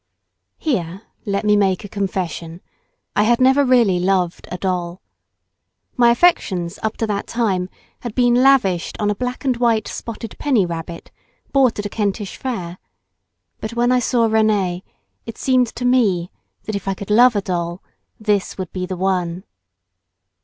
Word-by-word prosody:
Here 190 Hz, -, -2 dB, 0.2 s
let 200 Hz, +1 st, -1 dB
me 210 Hz, 0 st, +4 dB
make 195 Hz, -1 st, +1 dB
a -, -, -6 dB
confession, 185 Hz, -4 st, -4 dB, 0.5 s
I -, -, +3 dB
had 235 Hz, +3 st, +3 dB
never 265 Hz, +2 st, +5 dB
really 235 Hz, -8 st, +3 dB
loved 180 Hz, -1 st, 0 dB
a 180 Hz, -, -4 dB
doll. 180 Hz, -1 st, -2 dB, 1.0 s
My 240 Hz, -2 st, +5 dB
affections 205 Hz, -, +2 dB
up 220 Hz, 0 st, -2 dB
to 225 Hz, -, 0 dB
that 205 Hz, -2 st, -3 dB
time 195 Hz, -6 st, -1 dB, 0.3 s
had 240 Hz, -3 st, -7 dB
been 245 Hz, -1 st, +3 dB
lavished 245 Hz, -11 st, +2 dB
on 210 Hz, -1 st, +1 dB
a -, -, -2 dB
black 250 Hz, +4 st, -4 dB
and 260 Hz, -2 st, +2 dB
white 230 Hz, -3 st, +1 dB
spotted 230 Hz, -1 st, -7 dB
penny 255 Hz, -10 st, +2 dB
rabbit, 170 Hz, 0 st, -7 dB, 0.4 s
bought 265 Hz, -4 st, +3 dB
at 205 Hz, -, -4 dB
a -, -, -2 dB
Kentish 205 Hz, -1 st, -2 dB
fair; 185 Hz, -9 st, -5 dB, 0.8 s
but 220 Hz, +1 st, -5 dB
when 240 Hz, +1 st, +2 dB
I 250 Hz, -, +4 dB
saw 235 Hz, -1 st, +2 dB
Rénee, 210 Hz, -5 st, +1 dB, 0.5 s
it 230 Hz, -, -7 dB
seemed 255 Hz, -2 st, +2 dB
to 245 Hz, -, -4 dB
me 205 Hz, -9 st, +2 dB, 0.3 s
that 215 Hz, -, -5 dB
if 200 Hz, -1 st, -5 dB
I 195 Hz, -, 0 dB
could 200 Hz, +1 st, -7 dB
love 240 Hz, +2 st, +6 dB
a 205 Hz, -, +1 dB
doll, 175 Hz, -1 st, -3 dB, 0.4 s
this 210 Hz, -3 st, 0 dB
would 185 Hz, -3 st, -6 dB
be 185 Hz, -1 st, -3 dB
the 185 Hz, -1 st, -4 dB
one. 180 Hz, -1 st, -1 dB
205 Hz, 165 wpm, -20 LUFS, 185-240 Hz, 1.0 s, love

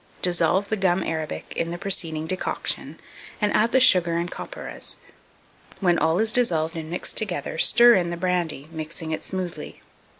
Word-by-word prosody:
Dissolve 180 Hz, +2 st, +2 dB
the 220 Hz, -, 0 dB
gum 190 Hz, -1 st, +1 dB
arabic 160 Hz, -1 st, -4 dB
in 165 Hz, -, -1 dB
the 175 Hz, -, -4 dB
preceding 170 Hz, -5 st, 0 dB
decoction, 185 Hz, +3 st, -2 dB, 0.4 s
and 210 Hz, -1 st, +1 dB
add 225 Hz, +2 st, +3 dB
the 260 Hz, -, +4 dB
sugar 175 Hz, -8 st, +4 dB
and 175 Hz, +1 st, -2 dB
copperas: -, -, -5 dB, 0.8 s
when 175 Hz, -3 st, +2 dB
all 160 Hz, +2 st, +2 dB
is 220 Hz, +2 st, +1 dB
dissolved 165 Hz, -10 st, +1 dB
and 160 Hz, -1 st, -6 dB
mixed 175 Hz, -, -3 dB
together, 175 Hz, -7 st, -1 dB
stir 240 Hz, +1 st, +7 dB
in 175 Hz, -5 st, +2 dB
the 170 Hz, -, -4 dB
brandy, 170 Hz, -5 st, -2 dB
mixing 160 Hz, 0 st, -5 dB
it 155 Hz, -, -3 dB
smoothly. 180 Hz, -, -6 dB
175 Hz, 165 wpm, -24 LUFS, 160-195 Hz, 0.8 s, stir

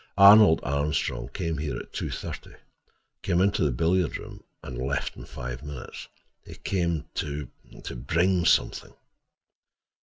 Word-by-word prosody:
Arnold 100 Hz, -3 st, +8 dB
Armstrong 70 Hz, +1 st, -1 dB
came 80 Hz, -2 st, -3 dB
here 70 Hz, -5 st, -3 dB
at -, -, -9 dB
two -, -, -3 dB
thirty—came 85 Hz, -, -6 dB
into 100 Hz, -1 st, +2 dB
the 75 Hz, -, +3 dB
billiard 80 Hz, +5 st, +1 dB
room -, -, -11 dB, 0.2 s
and 65 Hz, -, -7 dB
left 70 Hz, +2 st, -2 dB
in -, -, -10 dB
five 60 Hz, +1 st, -7 dB
minutes. 75 Hz, -3 st, -8 dB, 0.4 s
He -, -, -11 dB
came 85 Hz, -5 st, -1 dB
to 75 Hz, -2 st, -4 dB, 0.5 s
bring—something." 85 Hz, -1 st, +1 dB
75 Hz, 120 wpm, -26 LUFS, 70-90 Hz, 0.5 s, Arnold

